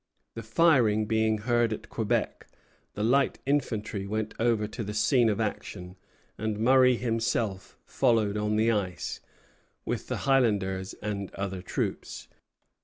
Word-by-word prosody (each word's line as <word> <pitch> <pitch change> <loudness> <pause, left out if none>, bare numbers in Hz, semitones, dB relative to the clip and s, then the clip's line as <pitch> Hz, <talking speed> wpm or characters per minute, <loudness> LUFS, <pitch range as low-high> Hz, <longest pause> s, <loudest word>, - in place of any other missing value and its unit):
The 115 - -6
firing 115 -4 +3
being 110 0 +1
heard 120 +1 +1
at 110 - -6
Quebec, 110 -3 -2 0.5
the 105 - -2
light 135 +4 +2
infantry 110 -8 -1
went 110 +1 -3
over 115 -2 +2
to 110 +2 -6
the 105 0 -5
scene 115 +2 +3
of 105 - -1
action, 95 -4 -4 0.4
and 110 -1 -2
Murray 125 +2 +5
himself 115 -4 -2
followed 110 -4 +1
on 105 0 0
the 110 +2 +3
ice, 95 -5 -3 0.7
with - - -3
the - - -4
Highlanders 100 -8 +1
and 100 -2 -3
other 95 -2 -4
troops. 90 - -4
110 Hz, 135 wpm, -28 LUFS, 105-120 Hz, 0.7 s, Murray